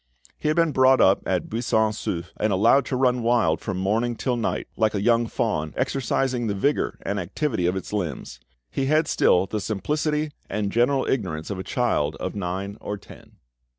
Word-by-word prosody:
He -, -, -4 dB
had 155 Hz, -, +2 dB
been 165 Hz, -2 st, +3 dB
brought 130 Hz, -1 st, +5 dB
up 95 Hz, -, +5 dB
at 95 Hz, -2 st, 0 dB
Buisson 110 Hz, -1 st, +1 dB
Souef, 85 Hz, -5 st, -4 dB
and 110 Hz, 0 st, 0 dB
allowed 105 Hz, +8 st, +4 dB
to 130 Hz, -, -1 dB
run 125 Hz, -1 st, +2 dB
wild 115 Hz, -9 st, +2 dB
from 100 Hz, -4 st, -3 dB
morning 110 Hz, +5 st, 0 dB
till 125 Hz, +2 st, -1 dB
night, 115 Hz, -, -2 dB
like 110 Hz, -1 st, +1 dB
a 100 Hz, -, 0 dB
young 115 Hz, +1 st, +3 dB
fawn, 90 Hz, -11 st, -2 dB
exercising 130 Hz, -2 st, 0 dB
the 100 Hz, -, -1 dB
vigour 140 Hz, +9 st, 0 dB
and 100 Hz, 0 st, -2 dB
activity 100 Hz, -, -1 dB
of 90 Hz, -, 0 dB
its 95 Hz, +2 st, -6 dB
limbs. 80 Hz, -10 st, -4 dB, 0.3 s
He 135 Hz, -, -1 dB
had 155 Hz, +2 st, +3 dB
still 90 Hz, +1 st, +3 dB
the 105 Hz, +2 st, -3 dB
simplicity 150 Hz, +9 st, -1 dB, 0.2 s
and 100 Hz, -1 st, -2 dB
general 130 Hz, +3 st, +2 dB
ignorance 90 Hz, -9 st, -2 dB
of 95 Hz, -, -4 dB
a -, -, -4 dB
child 80 Hz, -13 st, 0 dB
of 95 Hz, -, -4 dB
nine 100 Hz, +2 st, -4 dB
or 105 Hz, -, -4 dB
ten. -, -, -15 dB
110 Hz, 190 wpm, -24 LUFS, 95-130 Hz, 0.3 s, brought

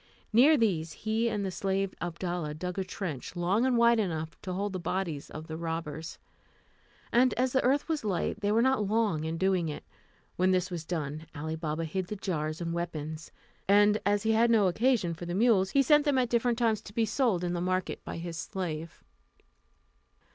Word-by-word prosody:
Near 280 Hz, +7 st, +7 dB
these 170 Hz, -, 0 dB
he 220 Hz, +4 st, 0 dB
and 205 Hz, -3 st, -2 dB
the 190 Hz, -, -2 dB
slave 195 Hz, +1 st, -1 dB
Abdalla 175 Hz, -3 st, -3 dB
dug 180 Hz, +3 st, -4 dB
a -, -, 0 dB
trench, 180 Hz, -6 st, -5 dB
long 190 Hz, +8 st, +2 dB
and 250 Hz, -2 st, +2 dB
wide 235 Hz, 0 st, +5 dB
enough 160 Hz, -5 st, -2 dB
to 185 Hz, -, -5 dB
hold 200 Hz, +2 st, -2 dB
the 185 Hz, -, -3 dB
bodies 170 Hz, -4 st, -3 dB
of 155 Hz, +1 st, -8 dB
the 160 Hz, -, -6 dB
robbers; 165 Hz, -1 st, -4 dB, 0.9 s
and 250 Hz, +1 st, +4 dB
as 255 Hz, +1 st, 0 dB
the 265 Hz, -, +2 dB
earth 275 Hz, +3 st, +2 dB
was 320 Hz, -5 st, -1 dB
light, 190 Hz, -5 st, -1 dB
they 205 Hz, 0 st, +1 dB
were 225 Hz, +2 st, +3 dB
not 260 Hz, -6 st, +2 dB
long 205 Hz, -8 st, +1 dB
in 160 Hz, +1 st, -2 dB
doing 185 Hz, -2 st, +1 dB
it. 150 Hz, -, -6 dB, 0.5 s
When 185 Hz, +1 st, +3 dB
this 185 Hz, 0 st, +1 dB
was 165 Hz, -2 st, -5 dB
done, 155 Hz, -2 st, -4 dB
Ali 155 Hz, +2 st, -3 dB
Baba 160 Hz, 0 st, -3 dB
hid 180 Hz, +3 st, -3 dB
the 210 Hz, -, -4 dB
jars 155 Hz, -6 st, -3 dB
and 170 Hz, -1 st, -3 dB
weapons; 160 Hz, -2 st, -5 dB, 0.4 s
and 205 Hz, +1 st, +5 dB
as 205 Hz, 0 st, +1 dB
he 225 Hz, -, +2 dB
had 230 Hz, +2 st, +4 dB
no 220 Hz, -4 st, +4 dB
occasion 215 Hz, -2 st, +2 dB
for 170 Hz, +1 st, -8 dB
the 175 Hz, -, -2 dB
mules, 200 Hz, -3 st, +4 dB
he 275 Hz, +5 st, +3 dB
sent 295 Hz, +2 st, +5 dB
them 285 Hz, -2 st, +2 dB
at 250 Hz, -2 st, +2 dB
different 235 Hz, 0 st, +1 dB
times 225 Hz, -3 st, +1 dB
to 205 Hz, -, -12 dB
be 230 Hz, -, +2 dB
sold 220 Hz, -7 st, +1 dB
in 175 Hz, 0 st, -1 dB
the 175 Hz, -, -2 dB
market 185 Hz, 0 st, -2 dB
by -, -, -6 dB
his 165 Hz, -1 st, -5 dB
slave. 165 Hz, -4 st, -5 dB
185 Hz, 205 wpm, -29 LUFS, 165-225 Hz, 0.9 s, Near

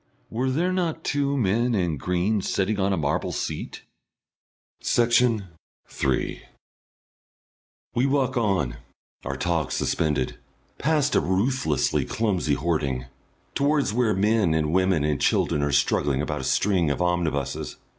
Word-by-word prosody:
(Were 125 Hz, +4 st, -1 dB
there 170 Hz, +8 st, 0 dB
not 165 Hz, -3 st, -1 dB
two 140 Hz, 0 st, 0 dB
men 115 Hz, +2 st, +1 dB
in 90 Hz, -6 st, 0 dB
green 90 Hz, +7 st, 0 dB
sitting 100 Hz, +3 st, -1 dB
on 100 Hz, +1 st, +1 dB
a 95 Hz, -, +1 dB
marble 70 Hz, -2 st, -1 dB
seat?) -, -, -5 dB, 1.0 s
Section 115 Hz, -4 st, +2 dB, 0.4 s
3 65 Hz, -2 st, -1 dB, 1.5 s
We 125 Hz, +3 st, +2 dB
walk 135 Hz, -2 st, +1 dB
on, 95 Hz, -, 0 dB, 0.5 s
our -, -, -4 dB
talk 85 Hz, -3 st, -1 dB
suspended, 75 Hz, -3 st, -1 dB, 0.4 s
past 150 Hz, 0 st, +1 dB
a -, -, +5 dB
ruthlessly 95 Hz, -, +1 dB
clumsy 95 Hz, -10 st, 0 dB
hoarding, 70 Hz, -6 st, -1 dB, 0.5 s
towards 145 Hz, -5 st, +1 dB
where 115 Hz, -3 st, +2 dB
men 100 Hz, -4 st, +2 dB
and 75 Hz, 0 st, 0 dB
women 95 Hz, -4 st, +2 dB
and 75 Hz, -3 st, 0 dB
children 75 Hz, -, +2 dB
are 70 Hz, 0 st, 0 dB
struggling 70 Hz, 0 st, +2 dB
about 75 Hz, -1 st, -2 dB
a -, -, -5 dB
string 90 Hz, -3 st, +2 dB
of 70 Hz, -, -1 dB
omnibuses. 85 Hz, -6 st, -1 dB
95 Hz, 130 wpm, -25 LUFS, 75-120 Hz, 1.5 s, a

